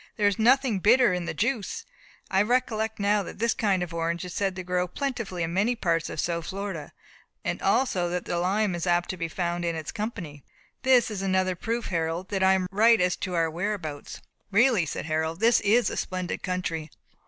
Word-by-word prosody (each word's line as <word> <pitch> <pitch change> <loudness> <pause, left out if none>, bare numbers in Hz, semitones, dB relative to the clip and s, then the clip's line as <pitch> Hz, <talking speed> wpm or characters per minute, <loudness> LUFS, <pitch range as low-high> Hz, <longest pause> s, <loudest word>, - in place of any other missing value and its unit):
"There 205 - +3
is 205 0 0
nothing 245 -2 +4
bitter 235 +1 +5
in 180 -1 -2
the - - -3
juice, 225 -1 -2 0.5
I 190 - +4
recollect 220 -1 0
now 205 +1 +2
that 190 - -8
this 230 +2 +1
kind 200 -6 +1
of 175 -1 -7
orange 170 +1 -2
is 180 - -7
said 195 -2 -1
to 185 - -5
grow 180 0 0
plentifully 230 - -3
in 165 +1 -3
many 210 +7 +2
parts 165 -6 0
of - - -6
South 170 +1 -2
Florida, 195 -6 -5 0.5
and - - -2
also 185 -9 +1
that 180 0 -3
the 175 - -1
lime 195 +2 +1
is 175 0 -3
apt 175 0 +2
to - - -5
be 170 -1 -2
found 175 0 -2
in 170 -1 -1
its 160 -2 -5
company. 185 - -5 0.4
This 255 -3 +4
is 200 -3 -4
another 185 -1 +1
proof, 230 +6 -3
Harold, 165 +1 -2
that 195 -2 -1
I 190 0 +5
am 190 -1 +1
right 225 +3 +5
as 180 0 +2
to 180 -1 -3
our 165 -1 +1
whereabouts." 170 -4 -4 0.3
"Really," 210 -4 +3
said - - -4
Harold, 160 +1 -1
"this 230 +2 +5
is 225 +4 +3
a - - -4
splendid 185 -1 -3
country. 165 -4 -3
185 Hz, 210 wpm, -26 LUFS, 170-215 Hz, 0.5 s, bitter